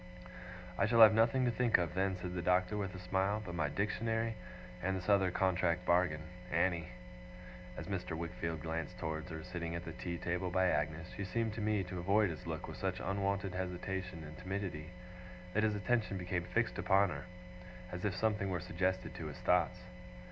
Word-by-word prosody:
'I -, -, +4 dB
shall 115 Hz, +1 st, +5 dB
have 110 Hz, -1 st, +11 dB
nothing 115 Hz, +4 st, +4 dB
to 120 Hz, -, +3 dB
think 120 Hz, 0 st, +3 dB
of 85 Hz, -1 st, -1 dB
then,' 95 Hz, 0 st, +1 dB
said 90 Hz, 0 st, -4 dB
the 90 Hz, -, -2 dB
Doctor, 90 Hz, +3 st, +2 dB
with 100 Hz, -3 st, -3 dB
a -, -, -6 dB
smile, 95 Hz, +3 st, +1 dB
'but 95 Hz, -5 st, -6 dB
my 75 Hz, -4 st, 0 dB
Dictionary; 115 Hz, +5 st, 0 dB, 0.5 s
and 95 Hz, +2 st, 0 dB
this 90 Hz, -, -6 dB
other 100 Hz, -2 st, +5 dB
contract 90 Hz, -1 st, +1 dB
bargain 85 Hz, -3 st, +3 dB, 0.3 s
Annie.' 85 Hz, -3 st, +2 dB, 0.9 s
As -, -, -5 dB
Mr. 90 Hz, -4 st, -3 dB
Wickfield 85 Hz, -1 st, -3 dB
glanced 85 Hz, +2 st, -3 dB
towards 80 Hz, 0 st, -3 dB
her, 80 Hz, -1 st, -6 dB
sitting 85 Hz, -1 st, -4 dB
at 85 Hz, +1 st, -5 dB
the 80 Hz, -, -5 dB
tea 85 Hz, +1 st, -4 dB
table 90 Hz, +2 st, -1 dB
by 95 Hz, +1 st, +3 dB
Agnes, 75 Hz, +3 st, -1 dB
she 100 Hz, -, -3 dB
seemed 110 Hz, +3 st, -1 dB
to 110 Hz, -, -4 dB
me 105 Hz, -2 st, +1 dB
to 90 Hz, 0 st, -5 dB
avoid 100 Hz, +2 st, +3 dB
his 85 Hz, +2 st, -8 dB
look 80 Hz, -1 st, -4 dB
with -, -, -7 dB
such -, -, -1 dB
unwonted 100 Hz, 0 st, -1 dB
hesitation 90 Hz, -1 st, -3 dB
and 75 Hz, 0 st, -9 dB
timidity, 90 Hz, -4 st, -4 dB, 0.6 s
that 110 Hz, -, +3 dB
his 110 Hz, -1 st, +2 dB
attention 105 Hz, 0 st, +1 dB
became 90 Hz, -1 st, -2 dB
fixed 115 Hz, +6 st, 0 dB
upon 100 Hz, 0 st, +4 dB
her, 70 Hz, -3 st, -5 dB, 0.7 s
as 90 Hz, 0 st, -5 dB
if 100 Hz, -3 st, 0 dB
something 105 Hz, -1 st, +1 dB
were 90 Hz, -2 st, -1 dB
suggested 95 Hz, +3 st, -1 dB
to -, -, -5 dB
his -, -, -7 dB
thoughts. 90 Hz, 0 st, +2 dB
90 Hz, 190 wpm, -35 LUFS, 85-100 Hz, 0.9 s, have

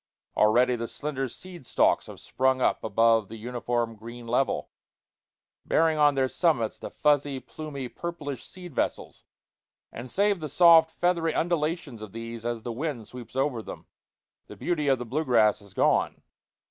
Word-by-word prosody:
Already 120 Hz, +4 st, +4 dB
the 115 Hz, 0 st, -4 dB
slender 135 Hz, -2 st, -3 dB
seed 175 Hz, +4 st, -10 dB
stalks -, -, +2 dB
have -, -, -10 dB
sprung 130 Hz, 0 st, +1 dB
up -, -, +1 dB
above 115 Hz, 0 st, +3 dB
the 115 Hz, -, -9 dB
uniform 120 Hz, 0 st, -2 dB
green 115 Hz, +2 st, -10 dB
level, 125 Hz, +3 st, 0 dB, 0.9 s
bearing 160 Hz, -1 st, +2 dB
on 145 Hz, -1 st, +5 dB
their 135 Hz, -1 st, +2 dB
summits 130 Hz, -7 st, 0 dB
the -, -, -6 dB
fuzzy, 145 Hz, -2 st, +1 dB
plumy, 140 Hz, -3 st, -7 dB
purplish 145 Hz, -3 st, -6 dB
seed 180 Hz, -2 st, -10 dB
vessels; -, -, -3 dB, 0.7 s
and 120 Hz, +2 st, -8 dB
save 200 Hz, +3 st, +2 dB
the 155 Hz, -2 st, -5 dB
soft, 165 Hz, +1 st, +7 dB
feathery 170 Hz, -2 st, 0 dB
undulations 160 Hz, -7 st, -1 dB
of 110 Hz, -3 st, -9 dB
these 115 Hz, 0 st, -6 dB
as 120 Hz, -2 st, -3 dB
the 120 Hz, -, -4 dB
wind 125 Hz, -3 st, -4 dB
sweeps 125 Hz, 0 st, -11 dB
over 135 Hz, -3 st, 0 dB
them, -, -, -9 dB, 0.6 s
the -, -, -11 dB
beauty 155 Hz, -5 st, -1 dB
of 135 Hz, -1 st, +4 dB
the 125 Hz, -, -6 dB
blue 140 Hz, +7 st, -1 dB
grass 110 Hz, -7 st, +3 dB
is 100 Hz, -2 st, -16 dB
gone. -, -, +1 dB
130 Hz, 160 wpm, -27 LUFS, 115-155 Hz, 0.9 s, soft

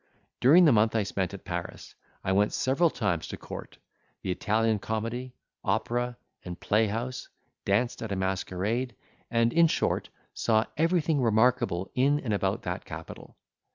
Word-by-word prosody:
During 165 Hz, +8 st, +7 dB
the 150 Hz, -, +6 dB
month 110 Hz, -1 st, +3 dB
I 110 Hz, -, +3 dB
spent 95 Hz, -2 st, -2 dB
at 100 Hz, -, -10 dB
Paris, 85 Hz, -2 st, -6 dB, 0.3 s
I 95 Hz, -, 0 dB
went 100 Hz, +2 st, +2 dB
several 140 Hz, +6 st, +2 dB
times 90 Hz, -, -1 dB
to -, -, -6 dB
court, -, -, -9 dB, 0.5 s
the 95 Hz, -, -1 dB
Italian 110 Hz, +3 st, +1 dB
comedy, 115 Hz, +5 st, -4 dB, 0.3 s
opera, 120 Hz, 0 st, -1 dB, 0.3 s
and 90 Hz, -1 st, -7 dB
playhouse, 115 Hz, +4 st, -1 dB, 0.4 s
danced 110 Hz, +5 st, +1 dB
at 110 Hz, -2 st, -4 dB
a -, -, 0 dB
masquerade, 95 Hz, +6 st, -2 dB, 0.3 s
and, 115 Hz, 0 st, +2 dB
in 170 Hz, 0 st, +6 dB
short, -, -, 0 dB, 0.2 s
saw 110 Hz, 0 st, +2 dB
everything 165 Hz, -2 st, +2 dB
remarkable 115 Hz, -5 st, +2 dB
in 140 Hz, +3 st, +3 dB
and 110 Hz, -5 st, -2 dB
about 100 Hz, -, -1 dB
that -, -, -4 dB
capital. -, -, -10 dB
115 Hz, 150 wpm, -28 LUFS, 100-125 Hz, 0.5 s, During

